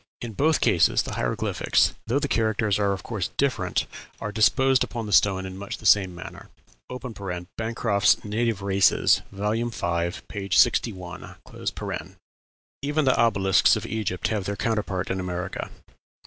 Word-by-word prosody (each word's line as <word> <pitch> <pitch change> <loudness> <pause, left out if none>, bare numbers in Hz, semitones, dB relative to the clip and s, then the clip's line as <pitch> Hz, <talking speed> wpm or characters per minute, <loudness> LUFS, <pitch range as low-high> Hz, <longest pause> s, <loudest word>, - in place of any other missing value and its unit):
In 120 -2 -6
both 155 +8 +2
cases 85 -2 +3
the - - -6
hieroglyphics, 60 - +1
though 120 +5 +1
the 145 0 0
characters 110 -4 +1
are 100 -1 +2
of 95 -2 -4
course - - -3
different, - - 0 0.3
are 105 - -4
disposed 130 +5 +3
upon 115 -2 -5
the 105 - -4
stone 95 0 +3
in 95 0 -7
much 100 - -6
the - - -14
same 95 -4 +4
manner. 85 - -10 1.1
(Bancroft's 110 -3 +1
"Native 110 -1 -1
Races," 100 -1 +3
vol. 105 +4 -1
v., 85 -5 -1 0.2
p. 100 -2 -6
61.) 95 -4 +1 1.5
Even 145 +2 0
the 130 - +4
obelisks 95 -6 +4
of - - -4
Egypt 105 -4 -2
have 105 -4 -2
their 100 - -2
counterpart 100 -3 -2
in 95 - -2
America. 90 -1 -4
105 Hz, 145 wpm, -25 LUFS, 95-115 Hz, 1.5 s, same